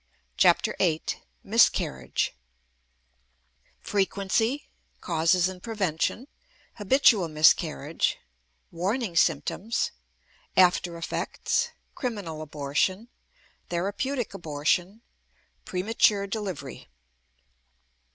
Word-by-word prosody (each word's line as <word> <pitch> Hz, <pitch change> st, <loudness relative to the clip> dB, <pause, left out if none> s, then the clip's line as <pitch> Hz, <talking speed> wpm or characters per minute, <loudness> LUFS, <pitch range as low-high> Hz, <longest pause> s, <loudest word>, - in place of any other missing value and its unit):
CHAPTER -, -, +3 dB
VIII 160 Hz, -4 st, +2 dB, 0.4 s
MISCARRIAGE 65 Hz, -2 st, +2 dB, 1.5 s
Frequency 205 Hz, +6 st, 0 dB, 0.3 s
Causes 170 Hz, +2 st, +2 dB
and 185 Hz, -1 st, -7 dB
Prevention 210 Hz, -, -2 dB, 0.5 s
Habitual 210 Hz, -3 st, +4 dB
Miscarriage 155 Hz, -, +2 dB, 0.5 s
Warning 195 Hz, +3 st, -2 dB
Symptoms 170 Hz, +7 st, +1 dB, 0.7 s
After 180 Hz, -2 st, +4 dB
effects 165 Hz, -, -1 dB, 0.2 s
Criminal 200 Hz, -, -4 dB
Abortion 155 Hz, +9 st, -1 dB, 0.6 s
Therapeutic 205 Hz, +9 st, -2 dB
Abortion 175 Hz, +5 st, -1 dB, 0.6 s
Premature 200 Hz, +1 st, +2 dB
Delivery. 200 Hz, -5 st, -6 dB
185 Hz, 65 wpm, -27 LUFS, 165-215 Hz, 1.5 s, Habitual